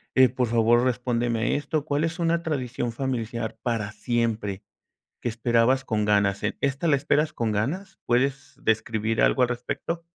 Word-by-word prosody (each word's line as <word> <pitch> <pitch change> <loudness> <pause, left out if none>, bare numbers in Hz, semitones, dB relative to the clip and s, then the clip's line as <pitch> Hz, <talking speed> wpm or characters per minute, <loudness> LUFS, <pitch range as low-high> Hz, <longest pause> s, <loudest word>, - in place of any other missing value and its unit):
eh, 130 -1 +7
por 125 0 -1
favor, 115 +1 +3
respóndeme 120 -2 0
esto, 145 +1 -2
¿cuál 145 +1 0
es 165 +2 -1
una 170 0 +1
tradición 130 -6 -2
familiar 115 -3 -3
para 110 -4 -2
siempre, 110 -3 -2 0.6
que 120 - -2
esperabas 120 +3 +2
con 105 -3 0
ganas? 100 -1 +2
Eh, 105 - -1
¿esta 140 +4 0
la 155 - +4
esperas 150 +2 +1
con 115 -2 -1
ganas? 150 - -2
¿Puedes 130 +3 0
describir 110 0 0
algo 130 - +4
al 125 - +4
respecto? 145 +7 -4
120 Hz, 160 wpm, -25 LUFS, 115-140 Hz, 0.6 s, eh